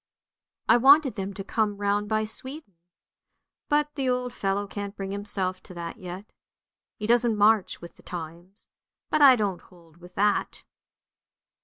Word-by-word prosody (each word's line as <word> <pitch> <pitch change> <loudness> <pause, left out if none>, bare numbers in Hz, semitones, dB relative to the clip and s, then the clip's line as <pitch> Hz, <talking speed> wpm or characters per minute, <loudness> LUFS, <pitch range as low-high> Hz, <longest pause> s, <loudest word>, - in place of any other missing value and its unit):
I - - +6
wanted 275 +1 +6
them 195 -1 -4
to 195 - -6
come 210 0 -1
round 205 0 0
by 215 0 +1
Sweden, 260 +2 -7 1.0
but 295 0 +1
the 270 -3 -1
old 250 -1 -1
fellow 200 -2 -1
can't 205 0 -6
bring 195 -1 -5
himself 195 -2 -1
to 180 - -13
that 170 -1 -6
yet. 185 +2 -8 0.7
He 210 - -5
doesn't 235 -1 +2
march 210 -1 +3
with 170 - -12
the - - -18
times, 175 +3 -9 0.4
but 305 - +2
I 270 -3 +9
don't 200 -6 -2
hold 170 -3 -21
with 180 +1 -15
that! 205 +1 0
205 Hz, 155 wpm, -26 LUFS, 185-240 Hz, 1.0 s, I